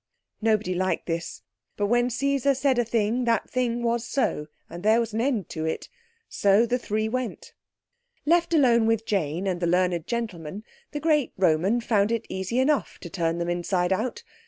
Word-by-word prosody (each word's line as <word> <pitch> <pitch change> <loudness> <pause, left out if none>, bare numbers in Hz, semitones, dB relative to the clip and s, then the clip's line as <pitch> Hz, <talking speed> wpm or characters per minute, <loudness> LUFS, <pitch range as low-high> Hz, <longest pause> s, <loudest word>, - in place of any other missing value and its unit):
Nobody 215 -4 +1
liked 185 +1 -1
this; 170 0 -4 0.3
but 205 - +1
when 240 +3 +2
Caesar 275 +2 +1
said 265 -1 +2
a - - +3
thing 230 +2 0
that 230 -1 +1
thing 240 -2 -1
was 235 0 0
so, 240 - -1 0.2
and 170 +1 -9
there 220 +3 +4
was 230 -2 -2
an 225 - 0
end 240 -7 0
to 160 - -4
it. 160 - -3 0.4
So 200 +3 +3
the 245 +2 0
three 215 -1 -1
went. 250 +1 -4 0.7
Left 340 +3 +3
alone 240 -8 +4
with 225 -1 +1
Jane 175 -2 -1
and 185 -2 -1
the 175 - 0
learned 180 -1 +1
gentleman, 205 -5 -4 0.3
the 295 - -3
great 300 -3 +1
Roman 185 +6 +2
found 210 -2 +2
it 230 -1 -1
easy 190 +5 -3
enough 275 +2 +1
to 170 - -8
turn 165 -2 -1
them 170 0 -2
inside 175 +1 0
out. 225 +5 -3
220 Hz, 180 wpm, -25 LUFS, 185-245 Hz, 0.7 s, there